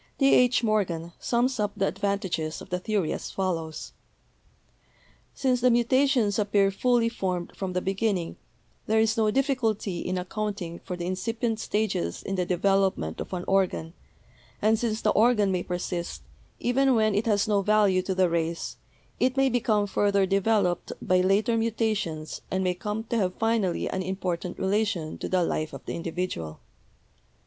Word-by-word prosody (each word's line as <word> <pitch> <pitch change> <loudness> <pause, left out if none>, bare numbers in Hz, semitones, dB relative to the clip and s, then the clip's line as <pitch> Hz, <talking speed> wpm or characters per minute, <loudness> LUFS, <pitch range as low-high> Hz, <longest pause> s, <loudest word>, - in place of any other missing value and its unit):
T. 275 -1 +4
H. 250 0 +4
Morgan 175 -6 0
sums 245 +1 0
up 210 -1 0
the 195 - +1
advan 200 0 -1
tages 160 -5 -3
of - - -12
the 180 - 0
theory 200 -4 -1
as - - -5
follows: 165 -5 -3 1.4
"Since 255 -3 +1
the 250 - +5
mutations 240 -2 +3
ap 210 0 -2
pear 200 -1 +4
fully 240 +3 +2
formed 185 -6 -3
from 190 -2 -4
the 180 - -1
beginning, 195 -3 -1 0.5
there 220 +1 +3
is 220 0 +3
no 220 -2 +2
difficulty 225 -7 0
in 185 +2 -2
accounting 180 -2 -4
for 180 -2 -6
the 175 - -4
incipient 225 +5 -2
stages 205 - -1
in 195 - -4
the 180 -2 -1
development 185 - +1
of - - -7
an 180 -1 -3
organ, 185 -4 +1 0.7
and 220 +1 +3
since 225 -2 -1
the - - +3
organ 215 -3 +3
may 180 -1 0
persist, 175 - -4 0.4
even 260 +2 +2
when 215 -1 +3
it 210 +3 0
has 205 -2 +2
no 205 -2 +2
value 205 -2 +3
to 185 +1 -3
the 185 -1 +4
race, 165 0 -2 0.4
it 255 +1 +1
may 270 0 +4
become 225 -4 +1
further 200 -1 +2
devel 195 +2 +2
oped 175 -1 -2
by 185 0 +2
later 200 +5 +2
mutations 215 -9 -1
and 190 0 0
may 180 -1 +1
come 210 +4 -4
to 235 +1 -2
have 185 -4 0
finally 225 -5 0
an 190 - -2
important 180 -1 -3
relation 190 -5 -1
to - - -4
the 185 -1 +2
life 155 -2 -2
of - - -9
the - - -4
individual. 165 - -4
200 Hz, 170 wpm, -26 LUFS, 180-225 Hz, 1.4 s, the